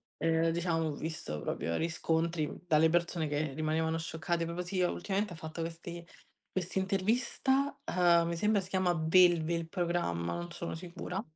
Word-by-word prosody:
ehm, 165 0 +2
diciamo 165 -1 0
ho - - -1
visto 150 - -4
proprio 85 - -2
riscontri 165 -1 0 0.2
dalle 160 -2 +5
persone 170 -1 +1
che 150 0 -1
rimanevano 160 +2 0
scioccate 165 +1 -2
proprio 170 +2 -3
sì, 185 +1 -3
uhm, 180 - +2
ultimamente 200 -1 -2
ha - - -8
fatto 160 +1 -8
quest'i 170 +1 -5 0.4
quest'intervista, 205 +9 0
uhm, 170 -2 +4
mi 170 - -2
sembra 210 +3 +2
si 185 - -10
chiama 185 -2 +2
Belve 170 0 +4
il 165 -1 -3
programma, 170 - -1
non 175 0 -5
sono 170 0 -4
sicura. 180 +2 -5
170 Hz, 160 wpm, -32 LUFS, 160-180 Hz, 0.4 s, dalle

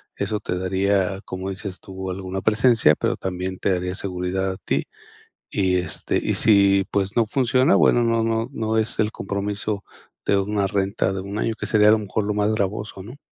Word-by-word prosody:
eso 105 - -2
te 90 -3 -3
daría, 95 +1 0
como 95 +1 -5
dices 95 -1 -6
tú, 95 -1 -6
alguna 95 0 -4
presencia, 110 -7 +4
pero - - -1
también 95 0 -4
te - - +1
daría 90 0 -2
seguridad 95 0 -2
a - - -9
ti. - - -1 0.6
Y, 95 -2 +1
este, 90 -1 -1
y - - 0
si, 100 -2 +4
pues 100 +3 -1
no 115 - +4
funciona, 130 - +3
bueno, 120 - +4
no 115 -1 +2
no 115 0 0
no 110 -3 -1
es 110 0 0
el 110 -1 +2
compromiso 100 0 -3 0.4
de 100 - +4
una 100 0 0
renta 100 -1 0
de 95 - -3
1 100 +2 -6
año, 115 - -1
que - - -4
sería, 105 -1 +4
a - - +8
lo 110 - +4
mejor, 105 0 -2
lo 105 - -1
más 105 +1 +1
gravoso, 105 -1 -3
¿no? 115 +8 -10
100 Hz, 200 wpm, -23 LUFS, 95-110 Hz, 0.6 s, a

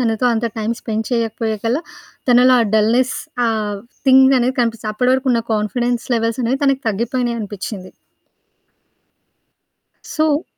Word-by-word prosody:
తనతో 230 0 +1
అంత 225 +1 -1
time 220 +2 -1
spend 220 -1 -3
చేయకపోయేకల్లా, 225 +1 -1 0.5
తనలో 250 +1 +6
ఆ 230 - +2
డల్‌‌‌నెస్ 235 +4 +2 0.3
ఆ - - +2 0.6
థింగ్ 265 0 +6
అనేది 250 +1 0
కనిపిస్తది. 230 -2 -1
అప్పడి 250 +4 +1
వరకున్న 260 -2 +1
కాన్ఫిడెన్స్ 240 +3 -1
లెవెల్స్ 230 +1 -1
అనేవి, 250 +3 0
తనకి 275 -1 +2
తగ్గిపోయినయనిపిచ్చింది. 215 -4 -3 2.1
సో... 310 0 0
235 Hz, 115 wpm, -18 LUFS, 220-255 Hz, 2.1 s, తనలో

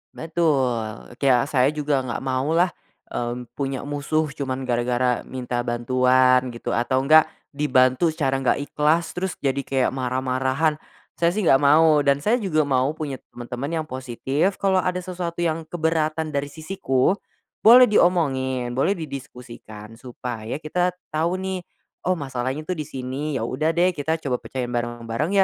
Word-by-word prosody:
Betul, 135 -11 -1
ke 140 - +1
ya, 125 -1 +5
saya 135 -2 +2
juga 145 -2 +1
gak 130 0 -4
mau 135 +4 0
lah, 175 +1 +3 0.4
mmm, 120 0 -4
punya 135 0 -3
musuh 145 +1 -1
cuman 135 -2 -4
gara-gara 125 0 0
minta 125 -1 -4
bantuan 125 +2 +3
gitu - - -4
atau 130 +2 +1
nggak 155 +2 +6 0.2
dibantu 130 +1 +3
secara 135 -3 0
gak 135 +2 +1
ikhlas 155 +3 +1
terus 185 0 -3
jadi 135 0 +1
kayak 135 -2 0
marah-marahan. 130 +4 0 0.4
Saya 170 +2 +2
sih 215 - 0
gak 135 -5 +5
mau 150 +1 +5
dan 140 0 +2
saya 235 +4 +2
juga 165 -8 +1
mau 140 +1 +1
punya 140 -5 -5 0.2
teman-teman 135 +7 -4
yang - - -13
positif 130 +7 -1
kalau 190 -1 +2
ada 180 0 -1
sesuatu 175 -2 -4
yang 160 -1 -1
keberatan 160 -2 -1
dari 140 0 -1
sisiku, 155 -3 0 0.5
boleh 245 +3 +8
diomongi, 135 - +2
boleh 135 +11 +1
didiskusikan 120 -7 -9
supaya 120 -2 -6
kita 180 +3 0 0.2
tau 165 +4 0
nih, 190 0 -3 0.5
oh 185 - +3
masalahnya 135 -1 -3
tuh 180 +4 -3
di 150 - -4
sini, 135 +3 -4
ya 115 - -1
udah 155 +7 -1
deh 180 +2 +3
kita 160 0 -1
coba 125 -3 -1
pecahin 125 -2 -5
bareng-bareng 120 - 0
140 Hz, 155 wpm, -23 LUFS, 130-160 Hz, 0.5 s, boleh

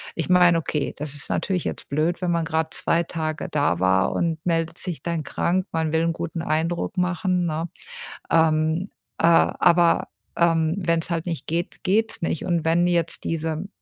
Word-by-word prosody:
Ich 165 - -3
meine, 180 -2 +5
okay, 150 -2 -2
das 150 0 -4
ist 145 - -5
natürlich 185 -3 -1
jetzt - - -5
blöd, 155 +6 0
wenn 180 -1 0
man 170 -1 0
grad 160 0 -1
2 170 +1 +1
Tage 155 -2 -4
da 145 - +1
war 95 +1 +2
und 165 -2 -1
meldet 165 -1 0
sich 175 -7 -3
dann 170 -2 -2
krank. 180 +6 0
Man 160 -1 -1
will 160 +1 +2
'n 165 - +1
guten 165 0 -4
Eindruck 165 +3 -1
machen, 180 0 0
ne? 160 +1 -2 0.6
Ähm, 160 +2 +2 0.3
äh, - - -3
aber, 170 0 +4 0.3
ähm, 165 -1 +2
wenn's 170 -2 0
halt 165 0 -2
nicht 165 -3 -4
geht, 170 +2 -3
geht's 220 +3 +1
nicht. 165 -1 -2
Und 170 -3 0
wenn 170 +2 +3
jetzt 170 -1 0
diese 160 +2 -2
165 Hz, 180 wpm, -23 LUFS, 160-175 Hz, 0.6 s, meine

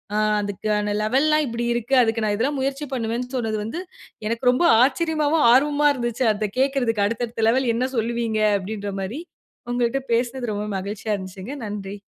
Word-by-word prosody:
ஆ - - +2 0.2
அதுக்கான 205 +1 -1
லெவல்லாம் 300 +7 +3
இப்படி 235 +1 -3
இருக்கு. 240 +3 0
அதுக்கு 225 -1 0
நான் 210 - +1
இதெல்லாம் 275 +5 0
முயற்சி 275 +2 -2
பண்ணுவேன்னு 240 0 -2
சொன்னது 225 -3 -1
வந்து 230 +12 -4 0.5
எனக்கு 230 +3 +1
ரொம்ப 255 +8 +2 0.2
ஆச்சரியமாவும், 310 +1 +1
ஆர்வமா 295 +3 +3
இருந்துச்சு 240 0 -1
அதை 210 0 -2
கேட்கறதுக்கு. 250 -6 +1
"அடுத்த 230 +3 -2
அடுத்த 225 -1 -2
லெவல் 255 0 +2
என்ன 250 +2 0
சொல்லுவீங்க?" 230 -1 -1 0.2
அப்படீன்ற 200 +1 -5
மாரி. 220 +11 -4 0.5
உங்கள்ட்ட 245 +2 0
பேசினது 240 0 -1
ரொம்ப 205 +1 -3
மகிழ்ச்சியா 205 +2 -3
இருந்துச்சுங்க. 190 +6 -7
நன்றி. 200 -1 -6
235 Hz, 160 wpm, -23 LUFS, 215-265 Hz, 0.5 s, லெவல்லாம்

